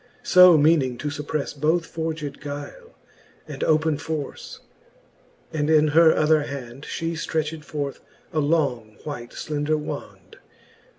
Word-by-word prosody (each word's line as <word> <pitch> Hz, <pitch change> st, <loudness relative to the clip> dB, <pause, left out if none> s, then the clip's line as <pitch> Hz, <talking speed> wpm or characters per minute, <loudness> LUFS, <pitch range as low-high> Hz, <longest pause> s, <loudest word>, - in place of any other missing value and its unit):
So 180 Hz, -2 st, +8 dB
meaning 145 Hz, -5 st, +3 dB
to 150 Hz, +5 st, -3 dB
fupprefle 145 Hz, -1 st, -4 dB
both 165 Hz, +3 st, +2 dB
forged 160 Hz, -3 st, -5 dB
guile, 150 Hz, -, -8 dB, 0.5 s
And -, -, -5 dB
open 155 Hz, -1 st, +2 dB
force: 155 Hz, -3 st, -6 dB, 0.9 s
and 150 Hz, -1 st, 0 dB
in 155 Hz, -1 st, +5 dB
her 160 Hz, +2 st, +6 dB
other 155 Hz, 0 st, +3 dB
hand 135 Hz, -2 st, -7 dB
She 165 Hz, 0 st, -3 dB
ftretched 160 Hz, -1 st, -3 dB
forth 145 Hz, -2 st, -4 dB, 0.3 s
a 155 Hz, -, +1 dB
long 140 Hz, -9 st, 0 dB
white 120 Hz, -6 st, -6 dB
fclender 150 Hz, 0 st, -2 dB
wand. 150 Hz, -, -8 dB
150 Hz, 125 wpm, -24 LUFS, 145-160 Hz, 0.9 s, So